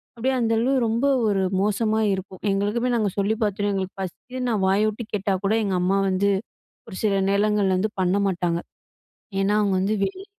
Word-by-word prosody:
அப்படியே 260 +3 0
அந்த 225 -1 +1
அளவு 260 +4 +1
ரொம்ப 230 +5 0 0.2
ஒரு 195 -2 +1 0.2
மோசமா 215 +2 +1
இருக்கும். 190 -1 -6
எங்களுக்குமே 210 +5 0
நாங்க 215 -3 +1
சொல்லி 200 +2 +1
பார்த்துட்டோம், 205 0 0
எங்களுக்கு 190 0 -4
பசிக்குதுன்னு 250 +7 -5
நான் 205 -3 0
வாய 195 +2 +3
விட்டு 220 +2 -6
கேட்டா 200 -1 0
கூட, 210 - +2
எங்க 195 - 0
அம்மா 190 +2 +2
வந்து 195 +2 +1 0.6
ஒரு 195 - -9
சில 200 -2 +2
நேரங்கள்ல 205 -1 +2
வந்து 210 +3 -1
பண்ண 185 +1 +2
மாட்டாங்க. 175 -2 0 0.8
ஏன்னா, 200 +2 +2
அவங்க 200 -2 +1
வந்து 210 +3 0
வெளியில 380 - -5
205 Hz, 180 wpm, -23 LUFS, 195-220 Hz, 0.8 s, வாய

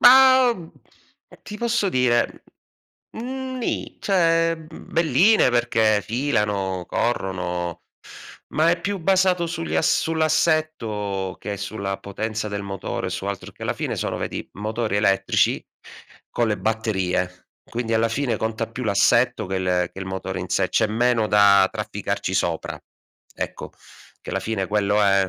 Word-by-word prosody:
Ma, 260 -1 +8
mhmm, 170 -5 -11 0.7
ti 210 - -8
posso 235 -3 +1
dire, 125 -5 +1 0.7
mhmm, 260 +2 -5
ni, 235 - -3
cioè 165 -3 +3
mhmm, 160 0 -13
belline, 170 - +4
perché 115 -3 +2
filano, 105 -7 -1
corrono, 90 -6 -2 0.7
ma 160 +2 +3
è 170 0 0
più 200 +2 -2
basato 185 -1 +2
sugli 165 0 -4
a - - +2
sull'assetto 155 - 0
che 105 -1 -5
sulla 100 -1 -4
potenza 110 +2 -4
del 100 -1 -4
motore 95 -1 -4
su 95 +1 -4
altro, 100 -2 -5
che - - -14
alla - - -1
fine, - - -3
sono, - - -2
vedi, - - -4
motori 110 +1 -2
elettrici 100 -2 +2 0.7
con 120 -2 0
le 105 - 0
batterie. 95 -5 -1 0.2
Quindi 115 -1 -3
alla 115 +1 +3
fine, 120 -1 -1
conta 110 0 -2
più 125 +2 -5
l'assetto, 100 -2 +3
che 95 0 -2
le 90 -1 0
che - - -11
il 95 - -5
motore 95 0 -4
in - - -6
sé, - - +1
c'è - - +3
meno 115 +1 +2
da 100 -2 +6
trafficarci - - -3
sopra. - - -1 0.5
Ecco, - - -5 0.5
che - - -7
la - - -1
fine 105 -4 -2
quello 105 0 +2
è 95 -1 +3
110 Hz, 145 wpm, -23 LUFS, 100-160 Hz, 0.7 s, Ma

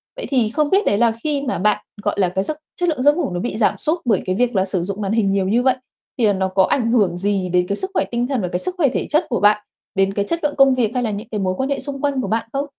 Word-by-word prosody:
Vậy - - -5
thì 245 -6 +2
không 300 +3 0
biết 400 +2 +3
đấy 200 - +2
là 235 +1 +3
khi 295 -2 0
mà 265 -2 -2
bạn, 210 +2 +1 0.2
gọi - - 0
là, 185 -2 +3
cái 190 +2 -1
giấc 305 +5 -4 0.2
chất 355 -1 +1
lượng 260 -5 -1
giấc 290 +1 +5
ngủ 345 - -1
nó 175 - -3
bị 230 +1 -3
giảm 220 - +2
sút 320 +3 0
bởi 215 -6 +2
cái 185 0 -1
việc 245 0 0
là 190 0 +2
sử 185 -2 -1
dụng 200 +3 -4
màn 195 - -2
hình 215 -3 +2
nhiều 195 -1 +1
như 235 +5 +2
vậy 260 - +3 0.4
thì 235 - +2
là 205 - +3
nó 190 -1 0
có 190 0 +2
ảnh 230 0 +1
hưởng 195 -7 +2
gì 195 -1 -1
đến 180 0 +1
cái 200 - -1
sức 380 - -3
khỏe - - +1
tinh 240 +1 0
thần 265 -6 -1
và 180 - -1
cái 180 0 -2
sức 365 - -3
khỏe 290 -6 +3
thể - - -3
chất 305 +4 +2
của 240 - 0
bạn, 210 0 +4 0.3
đến 195 0 +2
cái 200 0 -1
chất 335 +9 -2
lượng 290 -1 0
công 270 -1 +5
việc, 235 -4 +1
hay 250 -1 0
là 220 - -1
những 210 +2 -6
cái 210 - -2
mối 185 -1 0
quan 265 +1 -1
hệ 280 - -1
xung 275 -2 -6
quanh 280 -3 0
của - - -3
bạn 225 +1 -1
không? 275 +1 -1
230 Hz, 335 wpm, -20 LUFS, 195-275 Hz, 0.4 s, giấc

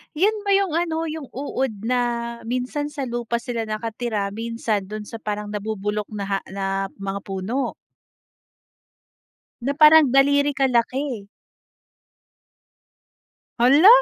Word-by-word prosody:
Yun 415 +5 +1
ba 400 - +3
yung 385 -5 +2
ano, 330 -1 -1
yung 310 -2 -5
uod 260 -5 -3
na 250 -1 +3 0.4
minsan 255 +4 -2
sa 295 -1 -5
lupa 235 -2 -2
sila 230 -2 -3
nakatira, 215 -1 -2
minsan 225 -2 -2
dun 210 +1 -7
sa 230 - -6
parang 210 -1 -4
nabubulok 210 0 -3
na 200 -1 -1
ha - - -4
na 195 0 -1 0.2
mga 195 0 -2
puno? 195 +8 -2 1.9
Na 275 +4 0
parang 305 -2 +8
daliri 285 +2 +4
kalaki? 255 -3 0 2.3
Hala! 275 - +6
240 Hz, 115 wpm, -23 LUFS, 210-285 Hz, 2.3 s, parang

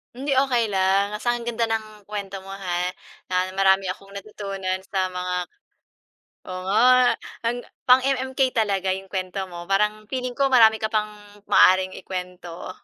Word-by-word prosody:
Hindi 275 +2 -1
okey 240 -4 +1
lang, 195 +1 +1
basta 240 +3 0
ang 240 -1 -4
ganda 235 -1 -1
ng 215 -2 -4
kuwento 200 -2 -6
mo, 195 - -10
ha, 180 -2 -2 0.4
na 185 0 +1
marami 195 0 +3
akong 195 +2 -6
natutunan 195 -2 -5
sa 190 -1 +1
mga 180 0 -3 1.1
oo, 185 0 -5
nga, 200 +4 +3 0.6
ang 235 +1 0 0.3
pang-MMK 260 +1 +3
talaga 195 -4 +1
'yong 190 0 -9
kuwento 190 0 -3
mo 175 0 -8
parang 210 +2 +1
feeling 255 0 -3
ko 275 - +4
marami 225 -4 +6
ka 220 - -1
pang 215 -1 -1 0.4
maaaring 185 0 +5
ikuwento. 180 -2 -7
195 Hz, 150 wpm, -23 LUFS, 185-220 Hz, 1.1 s, marami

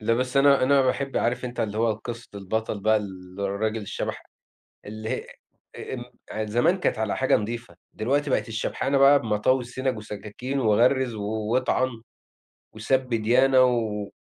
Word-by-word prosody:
لأ، 115 +2 +1
بس 130 +2 -2
أنا، 140 -1 +5
أنا 135 +1 +4
باحب 135 +1 -1
عارف 120 +2 0
أنت 125 0 -4
اللي 105 0 -2
هو 115 -1 +2
قِصة 115 +2 -8
البطل 100 +1 -3
بقى، 110 +2 +3
اللي 95 -1 -6
الراجل 110 +3 -1
الشبح 100 - -4 0.6
اللي 110 +1 -6
هي - - -3 0.5
أ - - -7
أم - - -5 0.3
يعني 110 0 -3
زمان 120 - +2
كانت 125 - 0
على 110 -2 -1
حاجة 130 0 +3
نضيفة، 115 +2 -5 0.2
دلوقتي 140 +6 0
بقت 130 - 0
الشبحنة 115 +5 -1
بقى 140 +1 +7
بمطاوي 115 +3 +1
السنج 125 +1 -3
وسكاكين 110 +5 -5
وغَرّز 120 +2 +3
و 105 - -5 0.3
واطعن 130 -1 0 0.7
وسَب 130 +4 0
ديانة 125 +4 +4
و 110 -5 0
115 Hz, 160 wpm, -25 LUFS, 110-130 Hz, 0.7 s, بقى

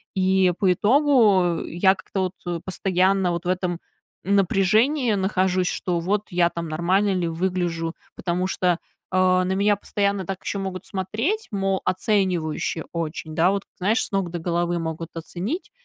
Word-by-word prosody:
И, 190 -1 +3
по 185 -2 +4
итогу, 210 - +3
я 190 +3 +3
как-то 185 -1 -3
вот 170 -1 -3
постоянно 185 0 +1
вот 170 +1 -4
в - - -1
этом 180 -2 -1 0.5
напряжении 215 - +3
нахожусь, 190 -2 +1
что 175 -3 -1
вот 200 +4 0
я 175 -1 +3
там 170 -1 -5
нормально 185 +6 +1
ли 175 -3 0
выгляжу. 170 -1 -2 0.2
Потому 180 0 -1
что, 180 -2 +1 0.3
а, 185 0 +3
на 190 - 0
меня 205 +1 +2
постоянно 200 -1 -1
так 190 +1 -5
еще 200 - -3
могут 190 -1 -5
смотреть, 225 - -2
мол, 195 -1 0
оценивающе 185 -5 0
очень, 160 -1 -4
да, 175 +4 +4
вот, 200 -1 -2
знаешь, 210 +4 +1
с - - -5
ног 195 -4 -1
до 175 - -4
головы 170 +1 -1
могут 160 0 -4
оценить. 185 - -5
185 Hz, 155 wpm, -23 LUFS, 175-195 Hz, 0.5 s, по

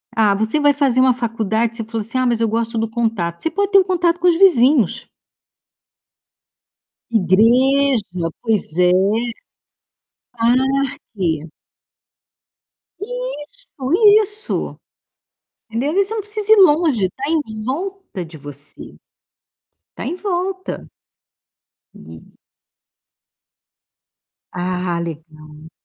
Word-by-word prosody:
ah, 215 -3 +3
você 220 +8 0
vai 290 -1 +4
fazer 270 -3 +1
uma 255 -1 +5
faculdade, 230 -1 -2
você 225 - -4
falou 225 0 -4
assim: 225 +5 -4
"Ah, 255 - +1
mas 235 -2 +1
eu 230 - +2
gosto 230 +1 -2
do 225 0 -1
contato", 220 -8 -2
você 325 - -1
pode 405 0 -1
ter 395 - +7
o 375 - +2
contato 350 -2 +1
com 360 - +2
os 345 - +4
vizinhos. 275 - +4 2.1
Igreja, 225 -1 +2
pois 215 -8 -1
é. 180 0 +4 2.0
Parque. 165 -7 -4 1.5
Isso, - - -7 0.3
isso. 420 +1 -4 0.9
Entendeu, 245 +6 -1
aí 395 +2 +2
você 420 +3 -4
não 445 - -2
precisa 420 +1 -1
ir - - +8
longe, 300 - +4
tá 265 - -8
em 220 -10 -2
volta 350 - -5
de 160 -1 -11
você. 145 0 -11 1.0
Tá - - -6
em - - -3
volta. 375 0 -4 1.1
E - - -13 2.3
Ah, 180 -1 -2
legal. 155 -1 -9
235 Hz, 110 wpm, -19 LUFS, -, 2.3 s, ir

